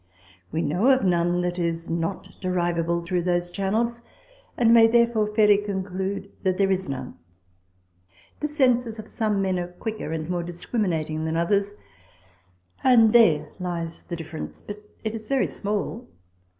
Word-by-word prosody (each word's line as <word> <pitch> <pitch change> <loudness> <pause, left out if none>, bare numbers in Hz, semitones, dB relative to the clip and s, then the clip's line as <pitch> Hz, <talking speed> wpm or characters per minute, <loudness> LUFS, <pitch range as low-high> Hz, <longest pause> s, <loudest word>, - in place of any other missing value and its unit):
We 165 - -1
know 185 - +2
of 260 -1 +4
none 175 -1 +2
that 180 0 -2
is 170 -1 -2
not 165 +3 -3
derivable 170 -2 0
through 175 +1 -1
those 175 0 0
channels, 225 +5 -1 0.6
and 230 -1 +5
may 225 -1 +8
therefore 235 -2 +3
fairly 210 -2 +6
conclude 195 0 -4
there 195 +1 +1
is 190 -3 -1
none. 130 -2 -6 1.2
The 300 - -1
senses 250 -6 +1
of 215 - -8
some 210 -3 0
men 185 -1 0
are 175 - -3
quicker 215 -1 -5
and 160 -1 -3
more 175 0 -1
discriminating 170 -3 -2
than 160 +1 -1
others; 200 +4 +1 1.1
and 230 -4 +6
there 155 -11 +5
lies 170 -2 -4
the 175 - -4
difference, 160 -1 -8
but 210 0 -8 0.2
it 220 -1 -2
is 220 -1 -7
very 270 -1 +2
small. 210 +3 -3
190 Hz, 150 wpm, -25 LUFS, 170-220 Hz, 1.2 s, may